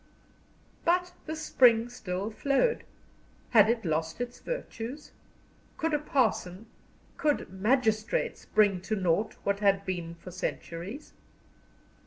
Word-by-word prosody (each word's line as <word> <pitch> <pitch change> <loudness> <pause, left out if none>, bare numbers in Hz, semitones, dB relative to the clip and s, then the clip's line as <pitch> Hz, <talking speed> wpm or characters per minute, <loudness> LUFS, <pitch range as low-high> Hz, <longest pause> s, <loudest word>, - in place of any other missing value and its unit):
But 355 +1 +2
the 315 - -3
spring 245 -7 +4
still 205 -4 -4
flowed. 280 - +1 0.7
Had 215 -2 +7
it 230 -3 0
lost 160 +2 -1
its 245 0 -4
virtues? 295 - -6 0.7
Could 325 0 -1
a 295 - +3
parson, 220 -9 0 0.5
could 295 -10 0
magistrates 220 +2 +1
bring 200 -4 +3
to 215 +4 -2
naught 190 +2 +1
what 200 0 0
had 200 -1 +3
been 175 -3 -4
for 180 +2 -11
centuries? 185 - -5
220 Hz, 115 wpm, -29 LUFS, 185-270 Hz, 0.7 s, Had